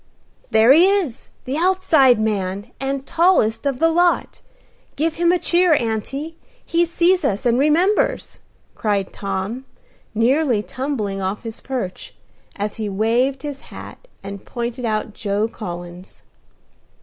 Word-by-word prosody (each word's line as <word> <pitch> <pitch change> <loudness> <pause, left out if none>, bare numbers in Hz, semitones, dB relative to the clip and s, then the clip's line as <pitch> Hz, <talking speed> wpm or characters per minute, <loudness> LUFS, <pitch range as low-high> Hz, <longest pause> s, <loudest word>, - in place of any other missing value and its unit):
"There 220 +3 +5
he 325 +4 +6
is! 385 - -1 0.2
The 265 +3 -2
outside 320 - +4
man, 205 0 -2
and 270 0 -3
tallest 325 -10 +2
of 275 -2 -1
the 330 +4 +3
lot. 350 +1 +1 0.5
Give 315 +2 0
him 340 +1 +2
a 360 - +3
cheer, 350 -1 +3
auntie: 270 +8 -3 0.3
he 340 0 +2
sees 350 +2 +2
us, 205 +2 -1
and 240 +1 +3
remembers!" 355 - +1 0.3
cried 200 -3 -1
Tom, 200 +6 -4 0.5
nearly 245 0 +2
tumbling 210 -3 -3
off 190 +4 -3
his 225 -1 -7
perch, 245 -9 -5 0.4
as 205 +1 -4
he 215 -2 -3
waved 235 +7 0
his 290 -2 -6
hat, - - -11 0.2
and 200 0 -8
pointed 240 0 -4
out 215 -1 -2
Joe 205 0 -1
Collins. 175 -4 -9
245 Hz, 135 wpm, -20 LUFS, 210-320 Hz, 0.5 s, he